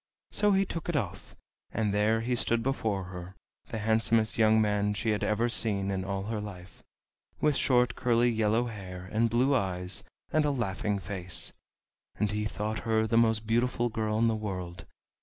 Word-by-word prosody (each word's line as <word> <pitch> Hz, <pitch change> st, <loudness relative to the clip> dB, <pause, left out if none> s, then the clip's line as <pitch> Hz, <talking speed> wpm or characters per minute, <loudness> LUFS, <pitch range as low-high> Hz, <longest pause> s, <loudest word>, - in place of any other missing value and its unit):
So 205 Hz, -1 st, +3 dB
he 195 Hz, 0 st, +3 dB
took 165 Hz, -2 st, -5 dB
it 170 Hz, -, -1 dB
off, 100 Hz, -11 st, -3 dB, 0.4 s
and 105 Hz, -2 st, 0 dB
there 110 Hz, +2 st, +2 dB
he 120 Hz, +2 st, 0 dB
stood 115 Hz, -1 st, +2 dB
before 110 Hz, -7 st, -1 dB
her, 90 Hz, +1 st, -8 dB, 0.3 s
the -, -, -5 dB
handsomest 110 Hz, 0 st, +2 dB
young 110 Hz, -1 st, +4 dB
man 105 Hz, -1 st, +1 dB
she 110 Hz, +1 st, 0 dB
had 105 Hz, -, -1 dB
ever 110 Hz, +3 st, +1 dB
seen 100 Hz, -4 st, +1 dB
in 95 Hz, -1 st, -2 dB
all 95 Hz, 0 st, -3 dB
her 110 Hz, +1 st, -3 dB
life, 95 Hz, -4 st, -10 dB, 0.6 s
with 150 Hz, -2 st, +2 dB
short 125 Hz, -2 st, +3 dB
curly 120 Hz, 0 st, +2 dB
yellow 110 Hz, +1 st, +2 dB
hair, 95 Hz, -5 st, -7 dB
and 115 Hz, +2 st, +2 dB
blue 125 Hz, +5 st, +3 dB
eyes, 90 Hz, -6 st, -1 dB, 0.3 s
and 155 Hz, -, +4 dB
a 150 Hz, -, +2 dB
laughing 105 Hz, -5 st, -1 dB
face. 95 Hz, -2 st, -3 dB, 0.6 s
And 105 Hz, -2 st, 0 dB
he 105 Hz, 0 st, -1 dB
thought 105 Hz, +1 st, -3 dB
her 110 Hz, -1 st, +1 dB
the 110 Hz, -, 0 dB
most 110 Hz, -1 st, +3 dB
beautiful 120 Hz, +1 st, +1 dB
girl 110 Hz, -1 st, -1 dB
in 115 Hz, +1 st, +3 dB
the 115 Hz, -, +2 dB
world. 90 Hz, -5 st, -5 dB
110 Hz, 180 wpm, -29 LUFS, 100-115 Hz, 0.6 s, young